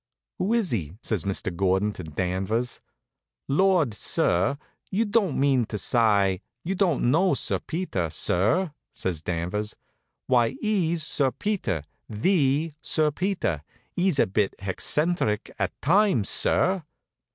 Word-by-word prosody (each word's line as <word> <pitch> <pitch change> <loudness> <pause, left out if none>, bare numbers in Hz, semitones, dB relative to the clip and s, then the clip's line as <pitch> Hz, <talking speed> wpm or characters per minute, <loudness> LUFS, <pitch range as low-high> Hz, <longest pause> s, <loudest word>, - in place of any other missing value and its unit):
"Who 195 - 0
is 225 -6 +1
he?" 90 -6 -3
says 105 -8 -2
Mr. 95 -2 -2
Gordon 95 +3 +1
to 95 - -8
Danvers. 95 +9 -2 0.7
"Lord, 170 - +3
sir, 100 +6 +1 0.3
you 215 +4 +1
don't 205 - +1
mean 135 -3 +3
to 105 - -5
sye 100 -3 +2 0.2
you 185 - -2
don't 175 -10 +2
know 180 +5 +3
Sir - - -1
Peter, 155 - -3
sir?" 110 - +1 0.2
says 95 -8 -3
Danvers. 90 +6 -3 0.5
"Why, 120 -3 +2
'e's 170 -7 +1
Sir 140 -3 +3
Peter 175 - -2 0.3
the 145 - +1
Sir 155 0 +1
Peter. 175 - -1 0.3
'E's 180 -4 +2
a - - +4
bit 100 +1 0
heccentric 105 - -1
at 95 -3 -2
times, 175 - +3
sir." 185 0 +2
125 Hz, 130 wpm, -25 LUFS, -, 0.7 s, a